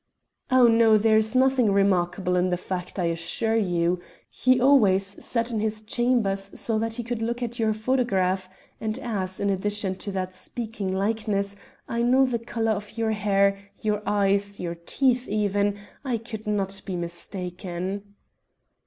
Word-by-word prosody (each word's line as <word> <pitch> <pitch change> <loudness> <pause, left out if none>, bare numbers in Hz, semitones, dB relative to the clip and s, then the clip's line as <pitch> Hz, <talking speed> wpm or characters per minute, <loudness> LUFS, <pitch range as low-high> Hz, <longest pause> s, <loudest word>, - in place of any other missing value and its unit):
"Oh, 255 -1 +6
no, 225 -1 +5
there 220 +1 +4
is 220 +3 +1
nothing 260 -4 +4
remarkable 185 -1 +2
in 180 +1 +2
the 180 - 0
fact, 180 0 -5
I 180 - 0
assure 170 +7 0
you. 175 -4 +1 0.3
He 255 0 +3
always 230 -8 +5 0.2
sat 230 0 0
in 225 - -1
his 215 0 0
chambers 215 -4 0
so 225 -2 +2
that 225 0 -2
he 240 - -4
could 235 -1 -4
look 235 +2 -2
at 240 +1 -4
your 220 -1 +2
photograph, 205 -5 0 0.3
and 220 +1 -2
as, 200 -8 -3
in 200 0 +1
addition 200 0 -1
to 200 - -5
that 185 -1 -3
speaking 215 0 -4
likeness, 200 0 -1 0.3
I 235 - -1
know 255 +3 +4
the 245 -2 -1
colour 225 -1 -1
of 210 +1 -4
your 225 -1 +1
hair, 200 -2 +2 0.2
your 210 -1 0
eyes, 200 0 +1
your 170 -1 -3
teeth 250 +9 0
even, 205 -1 +1 0.3
I 255 -4 -1
could 220 -1 -8
not 195 -2 -1
be 190 - -4
mistaken." 180 +3 -5
210 Hz, 160 wpm, -25 LUFS, 190-230 Hz, 0.3 s, Oh